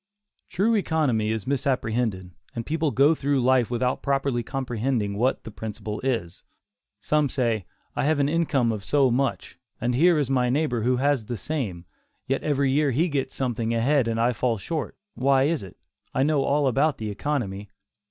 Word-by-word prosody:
True 210 +6 +1
economy 150 - +1
is 110 -3 -3
misapprehended, 120 -8 -1 0.2
and 115 -1 -4
people 160 0 0
go 140 +3 +4
through 140 -2 0
life 125 -1 +3
without 125 +1 -1
properly 135 -3 0
comprehending 120 -4 -2
what 125 +6 0
that 110 - -8
principle 105 0 -6
is. 115 -10 -2 0.6
Some 150 -2 +1
say, 115 -7 -1 0.3
"I - - 0
have 155 0 +2
an 140 - +3
income 145 -7 +1
of 105 -3 -4
so 135 +2 +3
much, 135 +1 -2 0.2
and 120 +2 0
here 165 +6 +4
is 145 -3 +1
my 125 -2 +1
neighbor 125 -3 0
who 125 +3 +2
has 135 -3 +1
the 120 - -3
same; 105 - -4 0.4
yet 135 - -1
every 140 -2 +1
year 145 +1 +2
he 155 +8 +1
gets 140 -3 -2
something 115 -3 -1
ahead 130 +2 +2
and 115 0 -1
I 120 +2 +2
fall 115 +1 0
short; 155 - -4 0.2
why 135 0 +3
is 155 +2 +1
it? 95 - -11 0.4
I 130 - +3
know 150 -1 +2
all 145 0 +2
about 140 +3 +2
economy." 105 -2 -3
130 Hz, 175 wpm, -25 LUFS, 115-145 Hz, 0.6 s, go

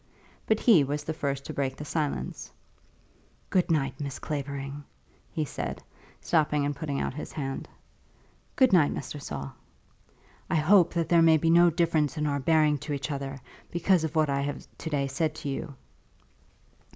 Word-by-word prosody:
But 220 -1 +3
he 200 - +6
was 145 +2 -3
the 160 - -3
first 140 -3 -3
to - - -5
break 135 -2 -2
the 150 - -7
silence. 150 -1 -3 1.0
"Good 180 -2 +2
night, 135 -4 0
Miss 140 -2 -4
Clavering," 140 -1 -5 0.5
he 155 - -1
said, - - -5 0.4
stopping 150 -3 +1
and 145 0 -1
putting 145 -3 -3
out - - -2
his 150 - -7
hand. 135 -3 -4 0.9
"Good 260 -6 +4
night, 155 -6 +5
Mr. 145 +1 -6
Saul." 70 - -6 1.0
"I - - +1
hope 175 +3 +4
that 170 -1 +1
there 170 -1 +5
may 165 -1 +6
be 165 +2 +2
no 175 +1 +7
difference 160 -3 +1
in 150 - 0
our 140 -1 0
bearing 150 0 +3
to 145 +2 -4
each 140 0 -3
other, 140 -1 -4 0.3
because 175 0 +2
of 160 0 -3
what 155 -1 +3
I 140 0 0
have 145 +1 -4
to 160 - -4
day 145 -2 0
said 155 +3 -1
to 155 -2 -5
you?" 140 +1 -5
150 Hz, 175 wpm, -28 LUFS, 140-165 Hz, 1.0 s, no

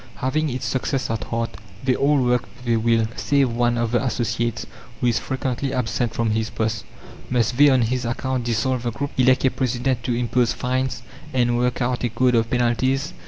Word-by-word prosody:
Having 150 +4 0
its 130 0 -4
success 130 -1 -1
at 110 -3 -3
heart, 115 0 -2 0.3
they 130 -1 +2
all 145 +1 +3
work 125 0 +1
with 120 -2 -1
a - - +3
will, 115 0 +2
save 140 -3 +2
one 120 0 +1
of 115 -1 0
the 120 - +1
associates, 120 -2 -1 0.3
who - - -1
is 120 -1 +2
frequently 130 +1 -2
absent 120 -1 -1
from 115 -2 +1
his 110 0 0
post. 110 -1 -2 0.4
Must 120 -1 +1
they 145 +3 +7
on 130 -3 +4
his 125 +2 -1
account 125 +1 -2
dissolve 120 +2 0
the 120 - -1
group, 140 +5 -4
elect 130 +1 +4
a 130 - +4
president 125 0 -1
to 120 - 0
impose 120 0 +1
fines, 125 -1 -2 0.3
and 120 -2 +2
work 125 +1 0
out 125 0 -1
a 120 - +1
code 125 +3 +2
of 115 -1 +2
penalties? 130 +5 +1
125 Hz, 200 wpm, -22 LUFS, 115-130 Hz, 0.4 s, they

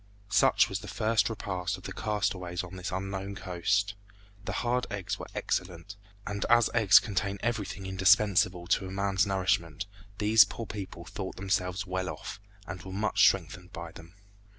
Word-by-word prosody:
Such 100 - +5
was - - -3
the - - -10
first 110 +1 +1
repast 95 -4 -3
of 95 - -15
the 100 - -6
castaways 95 -4 -2
on 90 +1 -9
this 90 -1 -5
unknown 95 +1 -4
coast. 95 0 0 0.5
The - - -3
hard 125 +1 +1
eggs 100 -4 -4
were - - -7
excellent, 90 +2 -3 0.3
and 100 0 -3
as 120 -1 +5
eggs 110 -5 +7
contain 100 -2 0
everything 105 -4 -3
indispensable 95 -1 +3
to 95 +2 0
man's 100 0 +1
nourishment, 95 -3 0 0.3
these 105 +1 +7
poor 115 - -6
people 95 -5 -7
thought 95 +1 -6
themselves 95 0 -1
well 95 0 -2
off, - - -7 0.3
and 90 -3 -7
were 95 - -9
much 105 +3 0
strengthened 90 -1 +2
by 85 -1 -7
them. 85 +3 -14
95 Hz, 160 wpm, -29 LUFS, 90-105 Hz, 0.5 s, eggs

